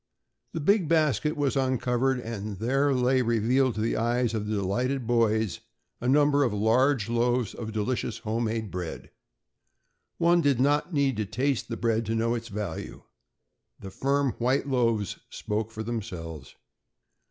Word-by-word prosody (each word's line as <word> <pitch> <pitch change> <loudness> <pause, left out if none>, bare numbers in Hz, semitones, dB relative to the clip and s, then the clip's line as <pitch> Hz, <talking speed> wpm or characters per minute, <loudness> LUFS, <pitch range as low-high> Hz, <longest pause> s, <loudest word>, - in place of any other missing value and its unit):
The 165 - -2
big 185 +3 +3
basket 150 -3 +2
was 145 -2 0
uncovered 130 0 +1
and 110 -4 -5
there 135 +7 +1
lay 130 0 +2
revealed 120 +2 +2
to 110 - -2
the 115 - 0
eyes 120 0 +1
of 105 -2 -2
the 110 - -1
delighted 120 +7 -1
boys 110 -5 +1 0.4
a 125 - -1
number 145 +1 +4
of 125 - +1
large 115 +3 +2
loaves 120 0 +1
of 110 -2 -6
delicious 110 +4 -2
homemade 110 -1 -2
bread. 90 -2 -6 1.1
One 170 +1 +4
did 140 -5 +2
not 145 +6 +2
need 140 -6 +1
to 110 - -1
taste 130 +5 -1
that 115 - -3
bread 115 -1 +1
to 110 - 0
know 115 +1 +1
its 115 -1 -4
value. 100 -6 -6 0.8
The 95 - -9
firm 140 +3 +1
white 130 +4 +1
loaves 115 -6 0
spoke 105 +1 -3
for 110 -1 -6
themselves. 90 - -6
120 Hz, 155 wpm, -27 LUFS, 110-135 Hz, 1.1 s, number